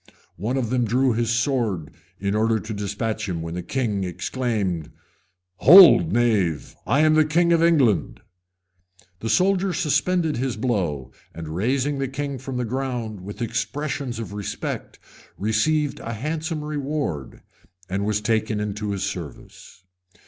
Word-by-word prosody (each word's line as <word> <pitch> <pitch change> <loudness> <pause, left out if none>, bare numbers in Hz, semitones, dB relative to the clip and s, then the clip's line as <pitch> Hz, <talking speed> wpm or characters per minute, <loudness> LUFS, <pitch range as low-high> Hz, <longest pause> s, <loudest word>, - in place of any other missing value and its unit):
One 115 +9 -2
of 120 -3 -2
them 125 -1 +2
drew 125 +3 +2
his 115 0 0
sword 115 - 0 0.3
in 100 +1 -1
order 110 +1 +2
to 110 +1 -6
despatch 105 +1 -3
him, 85 -3 -3
when 85 0 -5
the 90 - -3
king 105 0 -2
exclaimed, 95 - -2 0.7
"Hold, 160 - +8
knave! 105 -9 +1
I 140 +6 +3
am 155 0 +5
the 155 0 +5
king 170 +3 +2
of 165 - +3
England." 125 - +2 1.0
The 115 - -4
soldier 190 +2 +2
suspended 170 -1 +1
his 130 -1 -2
blow 90 - -1 0.2
and, 80 -1 -7
raising 135 +8 0
the 135 - -1
king 140 0 -4
from 130 0 -5
the 125 - -1
ground 120 -4 -3
with 100 +5 -6
expressions 120 +3 -3
of 110 -4 -6
respect, 100 -1 -5 0.4
received 140 +9 0
a 115 - -5
handsome 155 +6 -3
reward, 145 - -4 0.4
and 95 +2 -2
was 105 0 0
taken 110 -1 0
into 105 0 -3
his 95 - -3
service. 90 0 -8
115 Hz, 145 wpm, -23 LUFS, 100-140 Hz, 1.0 s, Hold